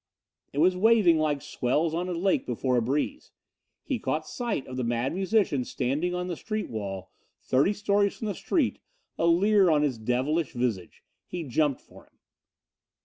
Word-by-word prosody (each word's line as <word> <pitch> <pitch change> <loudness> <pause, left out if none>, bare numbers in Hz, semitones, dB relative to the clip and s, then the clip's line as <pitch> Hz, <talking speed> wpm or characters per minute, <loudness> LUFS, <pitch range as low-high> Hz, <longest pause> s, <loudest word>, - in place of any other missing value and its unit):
It - - -9
was 180 +5 +4
waving 195 -5 +4
like 150 -3 0
swells 150 +6 0
on 175 +2 -2
a - - -2
lake 185 +3 0
before 125 +1 0
a 120 - +3
breeze. 145 - -2 0.5
He 265 -5 -2
caught 150 +1 -2
sight 235 - -3
of 130 - -8
the 130 - -2
Mad 120 +2 -1
Musician 190 - +1
standing 150 +9 -1
on 180 0 -2
the 180 -1 -3
street 215 +6 -4
wall, 95 -4 -5 0.3
thirty 135 +9 +3
stories 200 -1 +1
from - - -5
the 205 - -1
street, 290 - 0 0.4
a 170 - +2
leer 195 +3 +4
on 150 -2 +3
his 130 -6 -1
devilish 130 +7 0
visage. 120 -7 -3 0.2
He 175 -2 -5
jumped 145 0 0
for - - -17
him. - - -35
155 Hz, 175 wpm, -27 LUFS, 130-190 Hz, 0.5 s, was